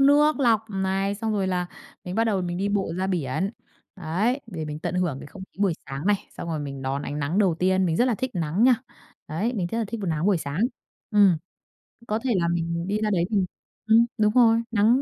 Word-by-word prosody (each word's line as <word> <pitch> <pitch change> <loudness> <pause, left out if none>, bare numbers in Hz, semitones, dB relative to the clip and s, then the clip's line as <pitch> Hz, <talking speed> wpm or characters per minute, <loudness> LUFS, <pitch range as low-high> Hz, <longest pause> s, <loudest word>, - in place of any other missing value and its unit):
nước 290 +1 +5
lọc 230 -4 +4
này, 195 +1 0
xong 220 +1 -2
rồi 195 -3 0
là 180 -1 0 0.4
mình 180 +1 -5
bắt 225 +1 +2
đầu 200 -5 +1
mình 175 0 -3
đi 200 +1 0
bộ 200 -5 0
ra 190 +1 0
biển. 180 +1 -1 0.5
Đấy, 195 - 0
để 165 -8 -5
mình 150 0 -5
tận 170 - -3
hưởng 175 -7 0
cái - - -9
không 190 +6 -11
khí - - -28
buổi 195 - +3
sáng 135 +6 -5
này, 205 - +4 0.2
xong 170 - -5
rồi 160 -2 -2
mình 140 -2 -6
đón 135 +2 -2
ánh 145 - -4
nắng 150 +6 -1
đầu 190 -5 +3
tiên, 185 0 +2
mình 165 -1 0
rất 245 - +4
là 250 -3 +2
thích 255 +3 -3
nắng 170 +6 +1
nha. 255 -1 +7 0.5
Đấy, 200 +11 -1
mình 190 -6 -1
rất 230 - -1
là 225 - 0
thích 230 0 -4
b - - -4
nắng 165 0 0
buổi 200 -4 +3
sáng. 145 +3 -4 0.5
Ừm. 200 -5 +5 0.7
Có 215 +1 0
thể 255 - 0
là 170 -2 +2
mình 170 +1 -1
đi 205 - 0
ra 215 - +1
đấy 175 -4 +2
mình 200 -4 +2 0.4
ừm, 225 +1 +6
đúng 210 0 +3
rồi, 230 -2 +5
nắng 225 +5 +4
190 Hz, 245 wpm, -25 LUFS, 170-220 Hz, 0.7 s, nha